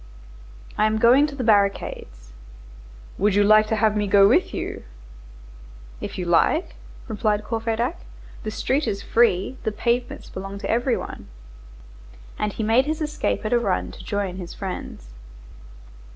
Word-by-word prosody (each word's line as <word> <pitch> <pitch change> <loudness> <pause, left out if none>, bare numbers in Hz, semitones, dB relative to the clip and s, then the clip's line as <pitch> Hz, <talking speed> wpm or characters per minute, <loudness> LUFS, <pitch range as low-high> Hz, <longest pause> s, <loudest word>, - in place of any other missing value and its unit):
"I 215 - +4
am 215 0 0
going 250 +6 +5
to 285 - -8
the 260 - -3
barricades." 200 - 0 0.9
"Would 205 0 +2
you 205 - +5
like 215 +1 +5
to 220 - 0
have 215 -1 +2
me 205 -1 0
go 200 0 +6
with - - +3
you?" - - -5 1.2
"If - - -6
you 180 - -3
like!" 175 - +2 0.3
replied 210 -2 0
Courfeyrac. 225 +6 -2 0.4
"The 215 - -4
street 265 +5 -1
is 200 -2 -3
free, 230 +1 +2
the 220 - -2
pavements 240 +3 -2
belong 195 +1 -7
to 200 - -3
every 240 +2 +1
one." - - -8 1.1
And 210 - -1
he 220 - -4
made 230 +6 +3
his 310 0 -2
escape 305 -6 -2
at 215 - 0
a 240 - +4
run 195 -6 -1
to - - -12
join 200 -3 -3
his 175 -2 -8
friends. 180 - -7
215 Hz, 155 wpm, -23 LUFS, 200-240 Hz, 1.2 s, go